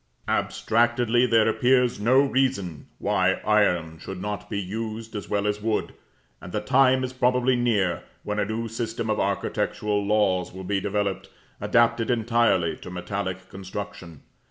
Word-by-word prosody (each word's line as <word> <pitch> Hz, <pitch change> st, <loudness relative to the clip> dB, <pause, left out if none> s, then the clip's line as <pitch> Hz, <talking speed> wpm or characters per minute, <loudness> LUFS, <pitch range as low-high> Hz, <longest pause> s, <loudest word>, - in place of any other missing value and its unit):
Abstractedly 120 Hz, +1 st, +2 dB
there 115 Hz, -2 st, +4 dB
appears 125 Hz, 0 st, +2 dB
no 125 Hz, +6 st, +4 dB
reason 130 Hz, -, -1 dB
why -, -, +2 dB
iron 90 Hz, -7 st, +2 dB
should 95 Hz, +2 st, -7 dB
not 105 Hz, +1 st, -5 dB
be 100 Hz, -, -2 dB
used 110 Hz, +3 st, -5 dB
as 105 Hz, -, -6 dB
well 100 Hz, -1 st, 0 dB
as 105 Hz, 0 st, -1 dB
wood; 110 Hz, 0 st, -1 dB, 0.5 s
and 90 Hz, -, -9 dB
the 105 Hz, -, -1 dB
time 130 Hz, +3 st, +3 dB
is 130 Hz, 0 st, -3 dB
probably 125 Hz, 0 st, +2 dB
near 105 Hz, -8 st, +1 dB, 0.2 s
when 105 Hz, 0 st, -2 dB
a 105 Hz, -, +1 dB
new 110 Hz, +2 st, -3 dB
system 115 Hz, 0 st, -3 dB
of 110 Hz, -, -1 dB
architectural 105 Hz, -1 st, -1 dB
laws 100 Hz, -3 st, +1 dB
will 95 Hz, +1 st, -8 dB
be 100 Hz, +1 st, 0 dB
developed, 100 Hz, -1 st, -2 dB, 0.3 s
adapted 115 Hz, -1 st, +2 dB
entirely 115 Hz, -8 st, +2 dB
to -, -, -10 dB
metallic 95 Hz, +1 st, -4 dB
construction. 95 Hz, -5 st, -8 dB
105 Hz, 150 wpm, -25 LUFS, 100-120 Hz, 0.5 s, there